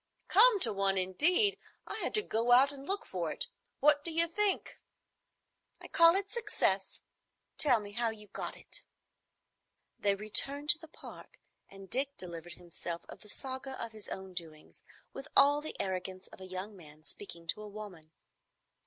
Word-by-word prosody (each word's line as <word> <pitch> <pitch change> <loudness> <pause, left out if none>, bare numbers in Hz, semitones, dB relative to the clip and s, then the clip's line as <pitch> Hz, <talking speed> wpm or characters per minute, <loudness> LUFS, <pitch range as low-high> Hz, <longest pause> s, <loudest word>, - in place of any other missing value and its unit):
"Come 435 +2 +7
to - - +4
one, 195 -1 0
indeed! 310 - +2 0.3
I - - -4
had - - -2
to 425 - +5
go 235 - +1
out 270 +3 +6
and 280 0 -9
look 395 +1 -1
for - - -3
it. - - -2 0.4
What 290 0 +4
do 335 - +3
you 330 +1 +5
think?" 400 +4 +1 1.0
"I - - -9
call 335 +1 +7
it 395 +1 +2
success. 460 -3 -1 0.6
Tell 255 -6 +6
me 205 -1 -9
how 235 +2 0
you 215 -1 -9
got 205 - -6
it." - - -8 1.1
They 200 -1 +1
returned 275 +8 +1
to 310 - +1
the 320 - -12
Park, 310 - -13 0.3
and 195 0 -13
Dick 275 +6 -2
delivered 170 -2 -8
himself 170 -1 -6
of - - -11
the 210 - -15
saga 265 +2 -3
of 230 - -5
his 215 -2 -10
own 190 -1 -7
doings, 160 -3 -8 0.3
with 270 +2 -8
all 285 +1 +7
the 310 - -8
arrogance 185 0 -4
of - - -14
a 185 - -8
young 185 +3 -7
man 155 -4 -15
speaking 170 -1 -9
to 215 - -2
a 210 - -8
woman. 195 -7 -10
220 Hz, 175 wpm, -32 LUFS, 190-295 Hz, 1.1 s, Come